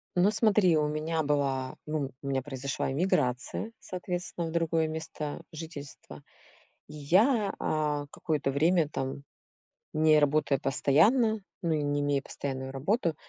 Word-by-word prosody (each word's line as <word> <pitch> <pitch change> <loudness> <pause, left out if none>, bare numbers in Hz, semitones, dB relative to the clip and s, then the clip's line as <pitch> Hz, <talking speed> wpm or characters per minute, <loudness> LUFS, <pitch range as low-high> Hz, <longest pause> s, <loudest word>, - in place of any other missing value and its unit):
Ну 185 +4 +4
смотри, 210 -6 +4
у 150 0 +2
меня 155 +2 -1
была 135 -3 0
ну, 150 -3 -2
у 140 - -7
меня 135 -1 0
произошла 135 0 -3
эмиграция, 145 - 0
соответственно, 180 -2 -4
в 160 - -5
другое 165 -1 +1
место 155 -2 -5
жительства. 155 -4 -9 0.6
И 150 - -12
я, 200 - +3
а, 150 -2 0
какое-то 145 -4 -1
время 160 +2 +3
там, 135 0 -4 0.7
не 155 0 +5
работая 145 -1 +2
постоянно, 215 - +3 0.2
ну, 170 -2 0
и 150 -1 0
не 145 0 0
имея 145 -1 +1
постоянную 135 -2 -5
работу, 165 - 0
155 Hz, 135 wpm, -29 LUFS, 140-170 Hz, 0.7 s, не